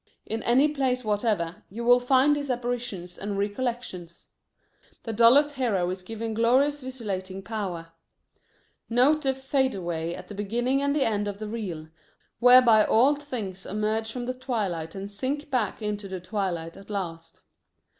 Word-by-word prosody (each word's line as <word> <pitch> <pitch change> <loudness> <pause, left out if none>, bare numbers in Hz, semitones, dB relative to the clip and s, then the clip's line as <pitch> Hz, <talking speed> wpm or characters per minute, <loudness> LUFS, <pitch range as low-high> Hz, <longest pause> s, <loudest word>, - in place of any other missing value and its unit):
In 225 +1 -3
any 260 +5 +4
plays 260 -4 -1
whatever, 205 -5 0
you 230 +5 -6
will 245 +1 +6
find 265 +3 +4
these 285 -1 -4
apparitions 240 -8 -3
and 200 0 -3
recollections. 205 -5 -4 0.7
The 225 - -4
dullest 245 +7 +6
hero 230 -10 0
is 185 0 -5
given 225 +3 -5
glorious 260 +6 +2
visualizing 195 -7 -5
power. 190 -6 -4 1.0
Note 265 +6 +4
the 270 -2 +1
"fadeaway" 190 - -1
at - - -10
the - - -8
beginning 240 +7 0
and 280 0 +1
the 285 - +2
end 205 -2 0
of 200 -1 -4
the 215 +1 -6
reel, 190 -8 -5 0.5
whereby 245 -3 +7
all 250 +8 +4
things 230 -10 -6
emerge 215 +2 -2
from 245 +1 -5
the 255 - -2
twilight 205 - -3
and 195 +1 -6
sink 275 +8 -3
back 230 -4 -1
into 210 -1 -3
the 190 -1 -5
twilight 180 -4 -3
at 195 +1 -14
last. 170 -5 -5
225 Hz, 155 wpm, -26 LUFS, 195-255 Hz, 1.0 s, whereby